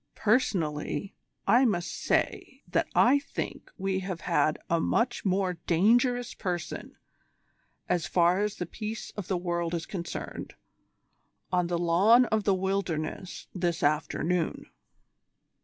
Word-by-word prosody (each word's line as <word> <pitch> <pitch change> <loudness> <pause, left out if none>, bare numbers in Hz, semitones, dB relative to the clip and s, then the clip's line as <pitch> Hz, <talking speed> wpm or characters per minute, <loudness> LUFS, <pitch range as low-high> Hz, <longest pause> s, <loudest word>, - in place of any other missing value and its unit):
Personally, 195 - 0 0.3
I 240 +6 +5
must 190 -8 0
say - - -1
that - - +1
I 270 +4 +6
think 280 - -6
we 190 0 -1
have 185 -2 -5
had 155 - +2
a 170 - +2
much 240 +7 0
more 185 -2 0
dangerous 240 +7 +3
person, 175 -4 -4 0.9
as 175 -3 0
far 175 +1 +3
as 210 0 0
the 175 - -4
peace 215 +5 -6
of 205 -4 -5
the 190 - 0
world 175 -1 -1
is 170 0 -3
concerned, 175 -4 -6 1.0
on 180 -1 +2
the 175 0 0
lawn 190 +9 +5
of 215 -2 0
'The 195 - +4
Wilderness' 185 -2 -3
this 175 -3 -1
afternoon." 160 +3 0
185 Hz, 125 wpm, -28 LUFS, 170-210 Hz, 1.0 s, I